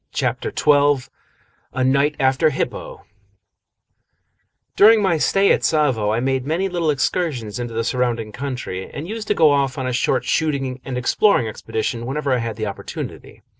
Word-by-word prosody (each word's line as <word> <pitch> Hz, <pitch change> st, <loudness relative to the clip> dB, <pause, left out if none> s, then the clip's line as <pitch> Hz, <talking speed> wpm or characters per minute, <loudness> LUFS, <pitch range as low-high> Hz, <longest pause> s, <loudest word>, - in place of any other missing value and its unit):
CHAPTER -, -, -2 dB
XII 145 Hz, -3 st, +3 dB, 0.7 s
A 130 Hz, -, -1 dB
NIGHT 140 Hz, +3 st, +2 dB
AFTER 135 Hz, +3 st, +3 dB
HIPPO 135 Hz, -, -4 dB, 1.7 s
During 220 Hz, +2 st, +7 dB
my 185 Hz, -6 st, +1 dB
stay 195 Hz, +5 st, +3 dB
at -, -, +2 dB
Tsavo 135 Hz, -10 st, +1 dB
I 110 Hz, -, 0 dB
made 130 Hz, +1 st, 0 dB
many 165 Hz, +7 st, -1 dB
little 175 Hz, -4 st, -1 dB
excursions 130 Hz, -, -1 dB
into 120 Hz, -2 st, -5 dB
the 115 Hz, -, 0 dB
surrounding 120 Hz, -3 st, -1 dB
country, 125 Hz, -8 st, -5 dB
and 150 Hz, +4 st, -7 dB
used 220 Hz, +1 st, -6 dB
to 210 Hz, -, +1 dB
go 160 Hz, -4 st, +5 dB
off 140 Hz, -2 st, 0 dB
on 130 Hz, -, -3 dB
a 125 Hz, -, -2 dB
short 120 Hz, -, 0 dB
shooting 135 Hz, -5 st, -1 dB
and 130 Hz, -2 st, -5 dB
exploring 125 Hz, -, +2 dB
expedition 115 Hz, +2 st, -4 dB
whenever 140 Hz, 0 st, -1 dB
I 125 Hz, -, +1 dB
had 115 Hz, -2 st, -4 dB
the 110 Hz, 0 st, -3 dB
opportunity. 100 Hz, -, -7 dB
135 Hz, 165 wpm, -20 LUFS, 120-155 Hz, 1.7 s, During